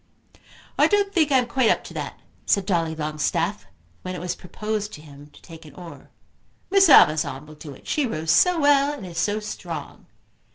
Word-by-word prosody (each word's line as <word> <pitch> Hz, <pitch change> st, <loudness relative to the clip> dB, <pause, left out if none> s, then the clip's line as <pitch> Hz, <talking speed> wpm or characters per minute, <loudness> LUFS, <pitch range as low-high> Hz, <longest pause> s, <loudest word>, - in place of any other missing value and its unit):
"I -, -, +6 dB
don't 405 Hz, -1 st, +1 dB
think 315 Hz, -6 st, +2 dB
I 265 Hz, -, +5 dB
am 250 Hz, -, +2 dB
quite 245 Hz, 0 st, +1 dB
up -, -, +1 dB
to -, -, -11 dB
that," -, -, -6 dB, 0.3 s
said 200 Hz, -2 st, +2 dB
Dolly 165 Hz, -4 st, -1 dB
Longstaff, 155 Hz, -1 st, -2 dB, 0.3 s
when 185 Hz, 0 st, -6 dB
it -, -, -6 dB
was 180 Hz, +1 st, -3 dB
proposed 210 Hz, +3 st, -5 dB
to 150 Hz, -, -10 dB
him 145 Hz, -1 st, -14 dB
to -, -, -19 dB
take 165 Hz, -2 st, -13 dB
an 155 Hz, -, -15 dB
oar. 175 Hz, -2 st, -12 dB, 0.6 s
"Miss 390 Hz, -3 st, +5 dB
Amazon 150 Hz, -, +5 dB
will 155 Hz, -, -13 dB
do 150 Hz, -2 st, -11 dB
it. -, -, -19 dB
She 295 Hz, -4 st, 0 dB
rows 160 Hz, -6 st, -2 dB
so 360 Hz, -, +4 dB
well, 285 Hz, -1 st, +4 dB
and 275 Hz, -10 st, -8 dB
is 170 Hz, -2 st, -6 dB
so 205 Hz, +4 st, 0 dB
strong." 175 Hz, -8 st, -8 dB
180 Hz, 200 wpm, -23 LUFS, -, 0.6 s, I